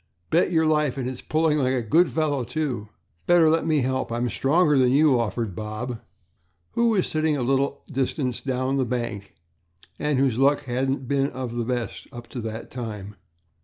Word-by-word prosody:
"Bet 170 +2 +3
your 160 -2 +3
life, 150 -4 +1
and 130 -2 -2
it's 130 -1 -5
pulling 155 -1 +1
like 130 -1 +1
a 125 - -1
good 165 +11 +3
fellow, 150 -5 0
too." 125 -4 -3 0.4
"Better 170 -3 +5
let 165 0 +1
me 155 -3 +2
help; 130 -1 -1
I'm 120 +1 -1
stronger 150 +2 +3
than 130 -2 +4
you," 140 -2 +4
offered 115 -3 -2
Bob, 110 +3 -5 0.7
who 235 0 +2
was 205 -5 +2
sitting 155 -1 0
a 130 - -1
little 135 +2 0
distance 130 -1 -1
down 130 0 -1
the 135 - +2
bank 120 -4 -4 0.6
and 150 -2 0
whose 130 -3 +1
luck 140 +2 +3
hadn't 130 +1 -2
been 140 0 +1
of 130 -2 -5
the 120 -1 -1
best 120 -3 -3
up 120 -2 -9
to 125 - -5
that 110 0 -6
time. 105 -5 -6
130 Hz, 185 wpm, -24 LUFS, 120-150 Hz, 0.7 s, Better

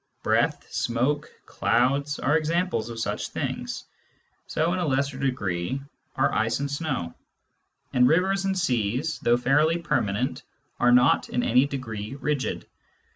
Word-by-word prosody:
Breath, - - +1
smoke, 130 +6 0 0.2
clouds, 140 +5 +1
are 145 +3 +1
examples 160 - 0
of 115 -1 -6
such - - -2
things - - -4 0.3
— - - -42
so, 165 +3 0
in 185 - -1
a 175 - 0
lesser 140 0 0
degree, 105 -4 -1 0.4
are - - +2
ice 115 +2 +1
and 140 0 -2
snow; 140 - -2 0.8
and 125 0 +5
rivers 190 +6 +2
and 190 0 0
seas, 125 - 0
though 120 0 +3
fairly 150 +7 +3
permanent, 125 -8 -1 0.4
are 125 - +4
not 125 +1 +4
in 125 - 0
any 125 +4 +4
degree 115 -4 -5
rigid. 140 -1 -2
135 Hz, 140 wpm, -26 LUFS, 120-150 Hz, 0.8 s, and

